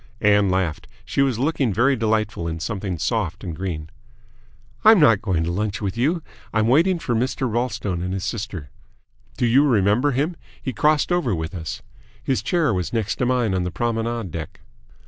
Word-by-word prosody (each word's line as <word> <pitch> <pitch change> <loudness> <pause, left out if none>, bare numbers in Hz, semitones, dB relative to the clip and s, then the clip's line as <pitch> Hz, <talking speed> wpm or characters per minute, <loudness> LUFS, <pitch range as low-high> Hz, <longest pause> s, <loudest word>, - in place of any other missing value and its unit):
Ann 105 -1 +4
laughed. 90 -4 -1 0.2
She 115 +6 0
was 135 -5 +2
looking 135 -2 +1
very 120 +7 +3
delightful 110 -6 0
in 80 0 -4
something 95 0 -3
soft 95 0 -2
and 85 -5 -5
green. 80 -3 -5 0.9
"I'm 220 -2 +8
not 115 -10 +5
going 95 -7 0
to 85 - -1
lunch 100 +3 -2
with 100 -2 -3
you. 155 +8 0 0.3
I'm 110 -1 +2
waiting 170 +9 +4
for 135 -7 -2
Mr. 130 +3 0
Ralstone 110 -6 -2
and 90 +1 -3
his 95 0 -3
sister. 95 - -5 0.7
Do 125 - +1
you 125 +5 +5
remember 115 0 +3
him? 145 +6 0 0.2
He 130 - -4
crossed 150 +4 +2
over 150 - +1
with 80 +2 -4
us. 80 -3 -6 0.4
His 130 - 0
chair 165 -9 +1
was 90 -2 -2
next 110 -3 -1
to 125 - 0
mine 120 -5 +1
on 95 -1 0
the 90 - -2
promenade 115 0 -2
deck." 80 -1 -7
110 Hz, 185 wpm, -22 LUFS, 95-130 Hz, 0.9 s, I'm